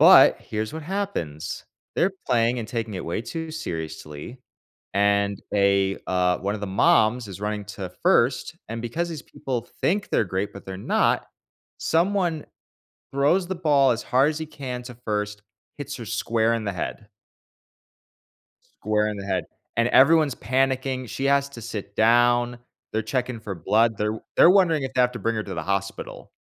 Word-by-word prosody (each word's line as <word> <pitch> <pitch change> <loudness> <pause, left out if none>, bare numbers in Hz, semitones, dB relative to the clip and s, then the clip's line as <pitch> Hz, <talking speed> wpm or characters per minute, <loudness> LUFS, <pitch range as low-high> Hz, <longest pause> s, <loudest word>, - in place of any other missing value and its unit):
But, - - +8
here's 110 0 -4
what 160 - -6
happens, 150 - -4 0.3
they're 190 - +3 0.2
playing 120 +1 +2
and 115 - -4
taking 115 -3 -3
it 90 - -4
way 85 - -2
too 160 +7 -5
seriously, 80 - -6 0.6
and 100 0 +2
they, 100 -1 +3
uh 90 -1 +2
one 100 +2 -2
of 105 - -5
the 105 - -3
moms 110 +4 +3
is 95 0 -8
running 105 0 -2
to 95 -3 -6
first, - - +2
and 115 +1 -5
because 160 +9 -2
these 160 -5 -6
people 120 -3 -5
think 205 +4 +1
they're 110 - +3
great, 95 +2 -2
but 100 - -11
they're 95 -1 -5
not, 95 - +1 0.5
someone 175 -2 +1 0.7
throws 155 +7 +2
the 190 - -2
ball 145 -6 +4
as 115 0 -1
hard 130 +4 +3
as 155 - -5
he 160 - -3
can 130 -5 -6
to 125 0 -9
first, 105 -1 -2 0.4
hits - - -5
her - - -7
square 115 0 +1
in 115 - -3
the 100 - -2
head. 105 +4 -5 1.6
Square 105 0 -1
in 105 - -5
the 100 - -6
head. 95 -3 -1 0.3
And 115 +1 +3
everyone's 150 -1 +5
panicking, 130 +1 0
she 135 - -3
has 140 0 +3
to 120 -4 -10
sit 105 -3 -6
down, 120 +1 +3 0.3
they're 110 - 0
checking 125 +1 -2
for 105 -3 -6
blood, 110 +6 +2
they're 105 - 0
w 110 - -6
they're 170 - +8
wondering 175 -6 +4
if 130 0 -4
they 125 - +3
have 125 0 +2
to 125 - -6
bring 115 0 0
her 110 - -2
to 100 - -6
the 80 - -4
hospital. 100 +2 -4
115 Hz, 180 wpm, -24 LUFS, 100-135 Hz, 1.6 s, But